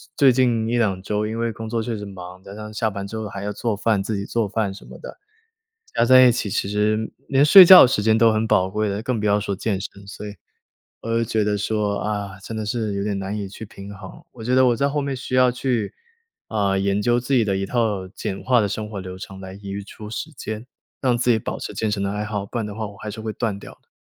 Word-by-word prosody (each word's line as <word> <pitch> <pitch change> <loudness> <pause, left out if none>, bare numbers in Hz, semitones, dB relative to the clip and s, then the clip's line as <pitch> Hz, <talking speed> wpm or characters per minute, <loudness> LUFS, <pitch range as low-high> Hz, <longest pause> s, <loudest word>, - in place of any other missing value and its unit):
最 135 -2 +6
近 120 -3 +2
1-2 110 -6 +1
周 105 +2 -1
因 110 +1 -4
为 115 0 0
工 110 0 -7
作 115 0 -1
确 115 -1 -3
实 105 - -6
忙， 90 -2 -10
加 100 +1 -11
上 105 0 -8
下 110 +1 0
班 100 -1 -5
之 110 +3 -6
后 110 -1 -4
还 100 0 -7
要 105 - -2
做 110 +1 -2
饭 105 0 +1
自 105 +2 -3
己 100 - -3
做 115 -1 -1
饭 105 -1 -1
什 95 - -13
么 - - -11
的， - - -10 0.8
加 - - +3
在 130 0 +8
一 - - +6
起 115 -3 -2
其 100 - -1
实 105 +1 0 0.2
连 135 0 +3
睡 185 +5 +10
觉 185 -3 +11
时 120 -4 0
间 110 +1 +3
都 115 0 +5
很 110 +1 0
宝 95 -3 +3
贵 105 +2 -1
了， 100 +1 -2
更 125 -2 -1
不 105 - -2
要 105 0 +3
说 100 0 -2
健 100 0 -2
身。 100 0 -9
所 105 +1 -8
以， - - -6 0.7
我 - - -8
就 115 - +2
觉 110 -1 0
得 105 0 0
说， 105 0 -1
啊， 100 -2 -3
真 105 +3 -7
的 110 -1 -3
是 110 -1 -2
有 100 - -1
点 100 -1 -1
难 95 +1 -4
以 100 -2 -4
去 100 +3 -9
平 100 -1 -11
衡。 95 - -11
我 115 -3 -10
觉 125 +2 +1
得 130 0 +5
我 120 -1 +3
在 140 +4 +1
后 145 +1 -1
面 140 -1 -3
需 130 0 -6
要 130 -1 +5
去， 125 -4 -2 0.5
啊， 100 -3 0
研 100 +1 +1
究 120 +3 +2
自 125 +3 -4
己 120 -3 +4
的 100 -1 0
一 95 - -1
套 105 -5 0
简 100 0 -5
化 125 -2 +3
的 105 - +1
生 105 +2 -4
活 100 -3 -5
流 90 0 -7
程 95 0 -9
来 95 0 -8
余 100 0 -5
出 105 +1 -10
时 135 - -5
间， 110 -4 -6 0.4
让 125 -3 +2
自 125 +1 +2
己 115 - +4
保 - - -5
持 - - -6
健 110 - -1
身 105 -2 -1
的 100 - -1
爱 105 +1 -3
好， 105 -2 -3
不 110 - -8
然 115 - -1
的 105 - -7
话 110 0 -4
我 100 -1 -11
还 105 - -6
是 110 +2 -8
会 110 0 -4
断 110 -4 -2
掉 - - -11
的。 - - -41
105 Hz, 295 characters per minute, -22 LUFS, 100-115 Hz, 0.8 s, 觉